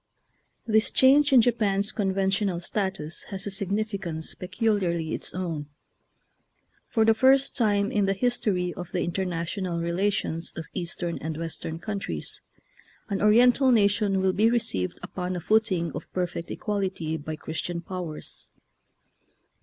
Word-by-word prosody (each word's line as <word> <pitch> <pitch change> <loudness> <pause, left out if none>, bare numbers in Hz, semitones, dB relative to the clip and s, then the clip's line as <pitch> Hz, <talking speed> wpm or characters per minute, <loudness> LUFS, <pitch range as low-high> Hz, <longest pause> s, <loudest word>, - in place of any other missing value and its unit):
This 220 -1 +3
change 280 +2 +5
in 255 -3 +8
Japan's 210 -4 +1
conventional 195 -2 0
status 190 -4 -3
has 195 -2 -3
a 205 - -2
significance 195 -4 -2
peculiarly 180 -4 -1
its - - -3
own. 165 -5 -3 1.2
For 225 -1 +3
the 225 - +6
first 265 +4 +4
time 205 -5 +2
in 205 -2 +2
the 195 - +1
history 195 -6 0
of 175 -1 -8
the 180 - 0
international 175 0 -2
relations 170 -1 -1
of 165 - -5
Eastern 175 0 -2
and 160 0 -4
Western 165 0 -3
countries, 200 +3 -5 0.7
an 200 -1 -1
Oriental 245 +5 +5
nation 205 -3 +3
will 190 0 +2
be 215 +4 +4
received 155 - 0
upon 180 0 -4
a - - -2
footing 185 -4 +1
of - - -7
perfect 175 -2 -3
equality 190 -6 -2
by 155 0 -5
Christian 160 +3 -4
powers. 170 -3 -6
190 Hz, 130 wpm, -26 LUFS, 170-215 Hz, 1.2 s, in